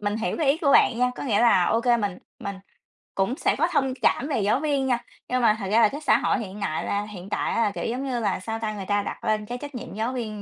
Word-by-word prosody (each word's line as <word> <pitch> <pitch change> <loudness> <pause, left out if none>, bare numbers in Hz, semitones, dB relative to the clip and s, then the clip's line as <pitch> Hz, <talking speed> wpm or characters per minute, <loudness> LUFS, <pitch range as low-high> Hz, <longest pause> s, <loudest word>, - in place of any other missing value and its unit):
mình 205 +1 -1
hiểu 225 - -2
cái 315 - 0
ý 300 - +1
của 280 -5 +2
bạn 235 - +5
nha, 250 0 +3
có - - -7
nghĩa 225 -7 +1
là 230 -7 +5
OK 230 +5 +1 0.2
mình 200 -3 -2 0.2
mình 200 -1 -5 0.6
cũng 195 +7 0
sẽ - - +1
có 330 +4 +2
thông 265 -1 +1
cảm 275 - +2
về 275 -7 0
giáo 210 +6 +2
viên 285 -3 0
nha, 245 -2 +1 0.3
nhưng 255 0 +1
mà 215 -2 +4
thật 195 - -4
ra 230 +2 +5
là 215 - +6
cái 290 - -7
xã - - +4
hội - - +1
hiện 205 -2 -7
nại 175 -6 -2
là 205 0 -1
hiện 200 -3 -9
tại - - -1
á - - +1
là, 210 - +2
kiểu - - -5
giống 250 +4 -2
như 255 -3 -1
là, 205 -4 0
sao 225 +4 -4
ta? 215 -1 -2
Người 195 -2 -6
ta 205 0 +1
đặt - - -6
lên 215 -1 0
cái 245 +3 -5
trách 285 +1 -8
nhiệm 245 - -7
giáo 225 +5 -2
viên 215 -4 -4
225 Hz, 300 wpm, -25 LUFS, 205-255 Hz, 0.6 s, là